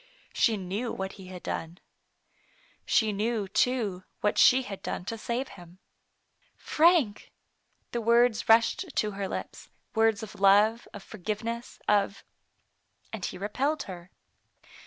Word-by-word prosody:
She 225 -2 +2
knew 200 +5 -3
what 190 0 -4
he 190 -2 -12
had 180 -1 -9
done. 165 +2 -4 1.1
She 220 -2 +3
knew, 215 0 -1
too, 205 -3 0 0.2
what 210 - +1
she 260 +1 +6
had 200 -4 -7
done 180 - -4
to 230 - -3
save 235 +4 -3
him. 175 -2 -14 0.4
" - - -41 0.2
Frank! 310 - +3 0.3
*' - - -45
the 235 - -2
words 235 0 +3
rushed 230 +9 +3
to 215 - +1
her 200 -1 -4
lips, - - -7 0.2
words 225 -2 +2
of 215 - -9
love, 210 +4 +4
of 205 - -10
forgiveness, 220 +4 -5
of 200 -1 +1 0.9
and 215 -4 -6
he - - -5
re 200 +3 -3
pelled 285 +7 0
her. 180 -2 -9
215 Hz, 145 wpm, -28 LUFS, 195-235 Hz, 1.1 s, she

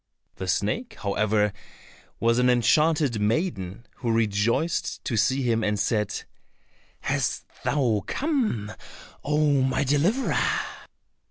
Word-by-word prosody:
The 95 - -5
snake, 220 - -1
however, 105 0 +1 0.7
was 115 +1 +2
an 125 0 +4
enchanted 135 0 +3
maiden, 105 - -1
who 120 - -1
rejoiced 115 +8 0
to 115 - -1
see 130 +5 +2
him, 115 -2 +1
and 105 -1 0
said, 105 0 0 0.8
"Hast - - -1 0.2
thou 120 -8 +1
come, 240 - -1 0.5
oh, 150 -2 +2
my 130 +1 +1
deliverer? 155 - +1
120 Hz, 105 wpm, -25 LUFS, 105-150 Hz, 0.8 s, an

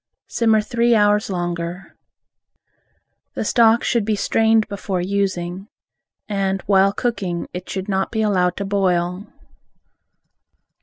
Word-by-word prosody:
Simmer 220 -2 +2
three 235 +2 +1
hours 210 0 +2
longer. 175 0 -4 1.4
The - - -3
stock 230 +1 +4
should 235 -3 +1
be 215 +1 0
strained 220 +1 +2
before 200 -2 -4
using, 190 0 -2 0.6
and 195 -2 -1
while 195 0 +3
cooking 200 -7 -3
it 180 0 -7
should 190 -1 -4
not 190 -1 -1
be 220 -1 -1
allowed 180 -4 +1
to 200 - -3
boil. 185 -1 0
195 Hz, 115 wpm, -20 LUFS, 180-215 Hz, 1.4 s, stock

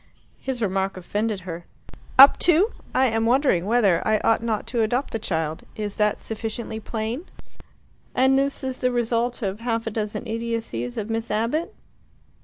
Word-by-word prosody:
His 255 -3 -3
remark 195 -1 -1
offended 205 +3 -2
her. 175 -2 -7 0.5
"Up 275 +2 +9
to? 355 +6 +5 0.2
I 260 - +4
am 225 -2 +1
wondering 240 - +2
whether 210 -7 +3
I 215 0 +2
ought 225 0 +3
not 225 -2 -2
to 235 - +2
adopt 245 +5 0
the 225 - -2
child. 160 -6 -2
Is 210 -2 -5
that 210 -1 +2
sufficiently 220 0 -5
plain?" 225 - -4 0.9
"And 265 +1 +4
this 275 +1 0
is 260 -1 -3
the 250 - +1
result 240 0 -1
of 195 +1 -2
half 230 -1 -2
a 225 - -2
dozen 210 -1 -3
idiocies 225 - -3
of 215 +2 -3
Miss 225 +1 -2
Abbott?" 230 +10 -1
225 Hz, 165 wpm, -24 LUFS, 210-245 Hz, 0.9 s, Up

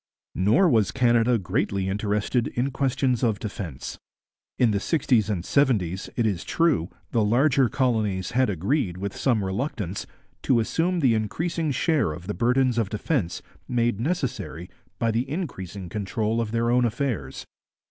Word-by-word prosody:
Nor 105 - +4
was 110 - +3
Canada 120 -1 +3
greatly 95 0 -1
interested 105 +4 0
in 130 +3 -1
questions 130 -2 0
of 110 -4 +2
defence. 95 - -6 0.6
In 120 -3 +4
the 100 - +1
sixties 120 - +1
and 95 -4 -2
seventies, 100 - +1
it 120 - +1
is 100 -5 -1
true, 150 - +1 0.2
the 115 -3 +2
larger 130 +3 +3
colonies 105 -7 0
had 130 0 +2
agreed, 95 - 0
with 100 +1 -4
some 115 -6 +1
reluctance, 100 - -3 0.3
to 125 - +3
assume 170 +9 0
the 130 -5 +4
increasing 160 - -1
share 145 - +1
of 85 +3 -9
the 105 - -3
burdens 125 +1 +2
of 110 -4 0
defence 105 - -2 0.2
made 120 -3 0
necessary 120 - -3 0.3
by 115 -1 +1
the 120 +4 -1
increasing 100 - -5
control 105 +4 -1
of 110 -2 -3
their 115 +1 +1
own 125 0 +3
affairs. 115 - -2
115 Hz, 150 wpm, -25 LUFS, 100-130 Hz, 0.6 s, Nor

